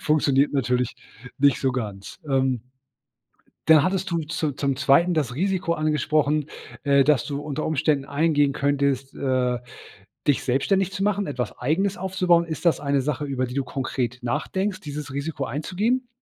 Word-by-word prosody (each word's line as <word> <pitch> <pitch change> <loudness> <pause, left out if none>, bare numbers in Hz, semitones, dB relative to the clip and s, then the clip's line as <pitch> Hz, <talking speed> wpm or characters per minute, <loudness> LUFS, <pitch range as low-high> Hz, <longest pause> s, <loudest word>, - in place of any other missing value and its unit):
funktioniert 145 -2 +2
natürlich 125 -3 0 0.4
nicht 140 -2 +4
so 135 - +2
ganz, 105 - -5
ähm. 130 -3 +1 1.0
Dann 160 -2 +7
hattest 190 +1 -1
du 170 - 0
zu 155 -2 -2
zum 140 0 -1
Zweiten 155 +7 +4
das 145 -7 -1
Risiko 185 +1 0
angesprochen, 150 -1 +1 0.4
äh, 140 -1 +4
dass 145 -4 +3
du 140 -2 -3
unter 150 0 -4
Umständen 150 -2 +1
eingehen 145 -1 +2
könntest 140 -1 0
äh, 125 -2 0 0.7
dich 145 - +2
selbstständig 185 +9 +1
zu 195 0 -5
machen, 205 0 +1
etwas 125 -6 -4
Eigenes 185 +10 0
aufzubauen. 180 -3 +2
Ist 160 0 -6
das 165 - +3
eine 140 -1 +1
Sache, 150 +2 -2
über 135 -2 -1
die 125 - -7
du 140 - 0
konkret 125 -1 -3
nachdenkst, 190 +11 -2
dieses 145 -2 -6
Risiko 140 0 -3
einzugehen? 210 - -1
145 Hz, 155 wpm, -24 LUFS, 135-165 Hz, 1.0 s, Dann